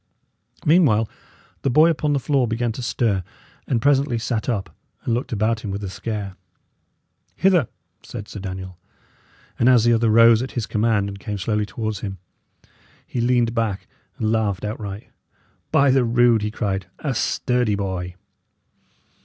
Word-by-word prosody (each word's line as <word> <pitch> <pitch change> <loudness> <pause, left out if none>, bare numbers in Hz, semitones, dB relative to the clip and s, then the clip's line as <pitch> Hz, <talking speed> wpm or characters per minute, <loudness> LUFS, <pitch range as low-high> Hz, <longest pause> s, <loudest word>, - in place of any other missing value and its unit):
Meanwhile, 145 -10 +4 0.5
the - - 0
boy 155 +6 +5
upon 150 -2 0
the 140 - +1
floor 135 -2 +1
began 115 +1 -1
to 120 - -6
stir, 115 -5 0 0.4
and 115 -3 0
presently 140 -3 +3
sat 115 +1 -2
up 95 - -3 0.3
and 115 - 0
looked 120 +3 -2
about 110 +1 +1
him 105 - -6
with 100 +1 -4
a 95 - -4
scare. 100 -3 -5 1.0
"Hither," 180 - +3 0.3
said 105 -4 -8
Sir 105 - -8
Daniel; 95 -2 -7 0.8
and 120 - +5
as 125 -3 +5
the 120 0 +4
other 115 0 +2
rose 115 +1 +6
at 130 - -5
his 120 -3 -2
command 110 -2 +1
and 100 0 -7
came 105 +1 -4
slowly 105 +2 -1
towards 110 -2 -4
him, 95 -2 -5 0.9
he 120 - -3
leaned 120 -1 +2
back 110 -4 -2 0.3
and 110 0 0
laughed 105 -3 0
outright. 105 -1 -6 0.6
"By 140 -1 +4
the 130 -1 +4
rood!" 120 -1 +4
he 105 - -1
cried, 100 -4 -3
"a 140 -3 -2
sturdy 125 -2 0
boy!" 95 -3 -4
115 Hz, 160 wpm, -22 LUFS, 100-120 Hz, 1.0 s, rose